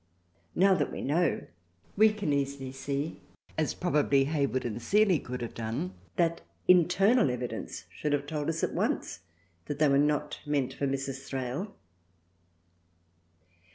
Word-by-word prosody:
Now 195 +2 +5
that 185 - 0
we - - -5
know, 160 +3 +1 0.5
we 215 +1 +6
can 205 -8 -1
easily 140 -1 -2
see, 140 +3 -4 0.3
as 155 -1 0
probably 145 -5 +2
Hayward 140 -3 0
and 120 0 -3
Seeley 200 - +4
could 125 0 -6
have 120 - -5
done, 110 -5 -3 0.2
that 170 -1 +1 0.3
internal 180 - +5
evidence 125 -1 -4
should 150 - -3
have 145 0 0
told 150 0 -2
us 165 0 -2
at - - 0
once - - -1 0.5
that 145 - -4
they 150 0 +4
were 140 0 +4
not 150 0 +1
meant 140 -3 0
for 140 +1 -1
Mrs. 135 0 -3
Thrale. 135 - -4
145 Hz, 145 wpm, -29 LUFS, 135-170 Hz, 0.5 s, we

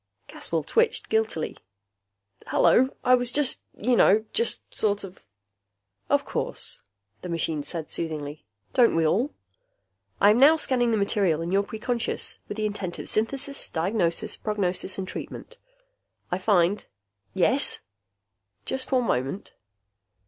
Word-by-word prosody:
Caswell - - -2
twitched 465 0 +1
guiltily. 220 -7 0 0.9
"Hello. 260 +2 +4
I 250 0 +4
was 245 -1 +4
just 290 -1 +1 0.2
you 245 +3 +2
know, 215 0 +5
just 465 +2 -1
sort 205 -1 +1
of 185 - -11 0.5
" 100 0 -49
"Of - - -1
course," - - -2 0.4
the 180 - -7
machine 165 -2 -1
said 160 +2 -3
soothingly. 150 -2 -5 0.3
"Don't 240 -7 +4
we 165 -1 +2
all? 225 - +1 0.9
I 205 - +6
am 220 - +3
now 295 +4 +8
scanning 255 -6 +2
the 225 - +2
material 200 -5 +1
in 170 - -4
your 195 +1 +3
preconscious 230 +3 -3
with 205 - -6
the 215 - -1
intent 200 -4 -3
of - - -5
synthesis, 275 +5 -1
diagnosis, 170 0 0
prognosis, 195 -3 -1
and 190 -1 -4
treatment. - - -8 0.7
I 180 - 0
find...." 190 0 +2 0.5
"Yes?" - - +2 0.8
"Just 265 0 -3
one 255 -2 +2
moment." 135 - -2
205 Hz, 135 wpm, -26 LUFS, 170-245 Hz, 0.9 s, now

